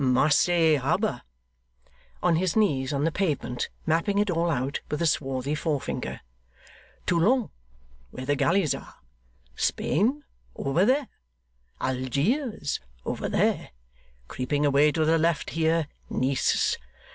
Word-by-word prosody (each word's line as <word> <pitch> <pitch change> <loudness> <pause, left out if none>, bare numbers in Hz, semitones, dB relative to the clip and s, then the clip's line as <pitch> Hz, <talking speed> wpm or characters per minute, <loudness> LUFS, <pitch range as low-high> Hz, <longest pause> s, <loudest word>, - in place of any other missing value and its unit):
Marseilles 155 +4 +4
harbour;' 135 - 0 1.0
on 175 -2 +3
his 180 0 0
knees 145 -11 +2
on 140 0 0
the 165 - +2
pavement, 150 -9 -2 0.2
mapping 170 +6 +1
it 205 -1 +2
all 170 0 +1
out 135 -2 -1
with 150 - -2
a 170 - +1
swarthy 135 -2 0
forefinger; 150 -2 -3 0.8
'Toulon 210 +8 +2 0.6
(where 130 - -7
the 145 +2 +1
galleys 170 -1 +2
are), 135 - -9 0.6
Spain 260 - 0 0.3
over 150 +8 +1
there, 265 +3 +2 0.7
Algiers 140 - -1 0.3
over - - -3
there. - - +1 0.6
Creeping 145 +3 -1
away 145 +1 +4
to 155 +1 +1
the 165 +1 +3
left 165 0 0
here, 160 0 +1 0.2
Nice. 130 +1 +1
160 Hz, 120 wpm, -26 LUFS, 140-180 Hz, 1.0 s, Marseilles